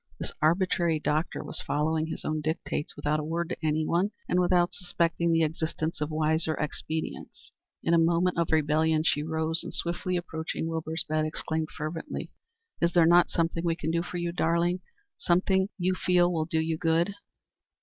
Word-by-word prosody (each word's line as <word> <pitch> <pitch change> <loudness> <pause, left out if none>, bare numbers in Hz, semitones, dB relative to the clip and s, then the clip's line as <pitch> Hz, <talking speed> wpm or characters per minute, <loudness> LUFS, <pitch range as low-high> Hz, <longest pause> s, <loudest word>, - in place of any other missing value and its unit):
This - - -3
arbitrary 170 0 +2
doctor 155 +2 -1
was - - -5
following 155 +2 0
his 160 - -6
own 155 0 -1
dictates 155 -1 -3
without 150 +1 0
a - - -3
word 165 +2 -2
to - - -3
anyone, 160 +5 +1 0.2
and 180 - +2
without 175 -1 +3
suspecting 170 -2 0
the 165 0 +4
existence 160 +1 -2
of 150 - 0
wiser 155 0 +1
expedients. 155 +1 -5 0.3
In 170 - +2
a 170 - +6
moment 170 +2 +2
of 170 - 0
rebellion 155 0 +3
she 150 - +2
rose, 160 +1 -1
and - - -6
swiftly 175 +1 -1
approaching 160 -2 -4
Wilbur's 160 0 -2
bed, 155 0 +1
exclaimed, 160 0 -2
fervently: 160 0 -5 0.5
"Is 170 0 +2
there 170 -2 +6
not 175 +1 +6
something 165 0 0
we 170 -1 +1
can 160 -2 -2
do 170 0 +1
for 175 +1 -5
you, 175 0 -1
darling? 170 +1 +1 0.4
Something 190 +2 +2
you 185 0 +1
feel 180 -1 +3
will 160 -2 0
do 160 0 0
you 160 0 -1
good?" 165 +4 +2
165 Hz, 175 wpm, -28 LUFS, 155-175 Hz, 0.5 s, a